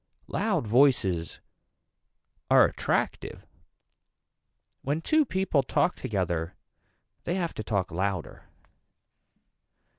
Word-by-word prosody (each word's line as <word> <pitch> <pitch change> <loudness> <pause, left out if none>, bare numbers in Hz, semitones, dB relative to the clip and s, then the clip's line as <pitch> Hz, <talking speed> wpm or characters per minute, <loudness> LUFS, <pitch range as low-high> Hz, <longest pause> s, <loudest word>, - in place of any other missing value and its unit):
Loud 180 - -1
voices 105 - +2 1.1
are - - +7
attractive. - - -2 1.4
When 145 +4 -1
two 310 - +2
people 190 - +1
talk 155 +6 0
together 85 -5 -2 0.7
they 175 - -1
have 175 -3 -2
to 110 - -6
talk 100 -4 -1
louder. 95 0 -3
115 Hz, 85 wpm, -27 LUFS, -, 1.4 s, are